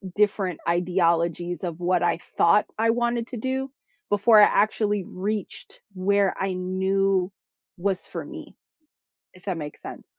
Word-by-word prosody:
different 200 -4 +1
ideologies 175 -1 0
of 175 -2 -4
what 180 0 +1
I 175 - +2 0.2
thought 170 +5 +5
I 225 0 +3
wanted 235 0 0
to 250 - -7
do 265 +3 -3 0.4
before 210 +2 +6
I 205 - +9
actually 210 -1 +1
reached 200 +2 -5
where 195 +1 +2
I 190 -1 -1
knew 190 +1 0 0.5
was 190 +1 -2
for - - -6
me - - -10 0.8
if 185 - -18
that 185 -3 -1
makes 150 -2 -7
sen - - -9
190 Hz, 140 wpm, -25 LUFS, 175-210 Hz, 0.8 s, I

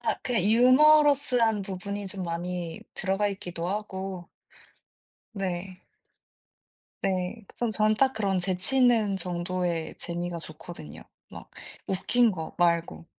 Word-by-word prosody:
아 - - 0
그냥 235 -7 0
유머러스한 255 -1 +5
부분이 200 +1 -5
좀 190 0 -4
많이 175 0 -4
들어가 195 +2 0
있기도 175 -3 -5
하고 190 -3 -4 1.1
네. 185 -1 -4 1.2
네. 185 +4 -1
그 - - -20
전 240 -2 0
전 215 0 +3
딱 265 -1 +4
그런 200 -5 0
재치 185 +8 -1
있는 225 -6 +4
정도의 175 -1 -2
재미가 175 0 -4
좋거든요. 155 - -9 0.3
막 - - -11 0.4
웃긴 225 +5 +3
거 165 -4 -6
말고. 170 -1 +1
190 Hz, 230 characters per minute, -27 LUFS, 175-220 Hz, 1.2 s, 유머러스한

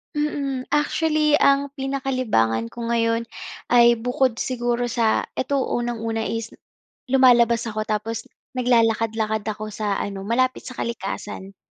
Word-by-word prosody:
Mm. 280 -3 -2
Actually, 300 +1 +1
ang 280 0 +3
pinaka-libangan 255 - 0
ko 235 - -7
ngayon 230 0 +1 0.5
ay 235 -1 +6
bukod 245 0 0
siguro 240 -1 -1
sa 230 -2 +1
eto, 280 +2 -1 0.2
unang-una 230 -2 -2
is 225 0 -4 0.6
lumalabas 240 -3 +5
ako 215 -1 -3
tapos 215 +1 -2 0.3
naglalakad-lakad 225 -3 +1
ako 215 0 -5
sa 205 -2 -1
ano, 195 -1 -4
malapit 255 +4 0
sa 255 - -11
kalikasan. 195 -3 -5
235 Hz, 120 wpm, -23 LUFS, 220-255 Hz, 0.6 s, ay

